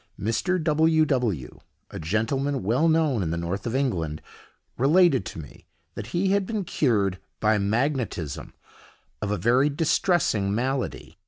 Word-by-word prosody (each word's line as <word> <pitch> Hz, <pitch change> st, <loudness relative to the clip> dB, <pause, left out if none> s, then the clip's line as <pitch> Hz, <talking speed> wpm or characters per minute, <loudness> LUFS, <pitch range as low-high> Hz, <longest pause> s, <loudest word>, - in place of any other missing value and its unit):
Mr. 170 Hz, -, 0 dB
W—— 160 Hz, 0 st, +3 dB
W——, 115 Hz, -, -2 dB, 0.3 s
a -, -, -6 dB
gentleman 115 Hz, -, -1 dB
well 125 Hz, -, +2 dB
known 155 Hz, -8 st, +2 dB
in 85 Hz, -, -1 dB
the 85 Hz, -, -2 dB
north 90 Hz, +6 st, -3 dB
of 115 Hz, -, -2 dB
England, 85 Hz, -, -1 dB, 0.6 s
related 140 Hz, -, +4 dB
to -, -, -8 dB
me 75 Hz, -4 st, -11 dB, 0.3 s
that 105 Hz, -, -7 dB
he 180 Hz, +9 st, 0 dB
had 200 Hz, -1 st, +1 dB
been 215 Hz, -3 st, -2 dB
cured, 105 Hz, -, 0 dB, 0.2 s
by 105 Hz, 0 st, +2 dB
magnetism, 110 Hz, -, -2 dB, 0.7 s
of 105 Hz, -, -2 dB
a 105 Hz, -, 0 dB
very 125 Hz, -, +3 dB
distressing 145 Hz, -, +1 dB
malady. 130 Hz, +2 st, -3 dB
125 Hz, 145 wpm, -25 LUFS, 100-155 Hz, 0.7 s, related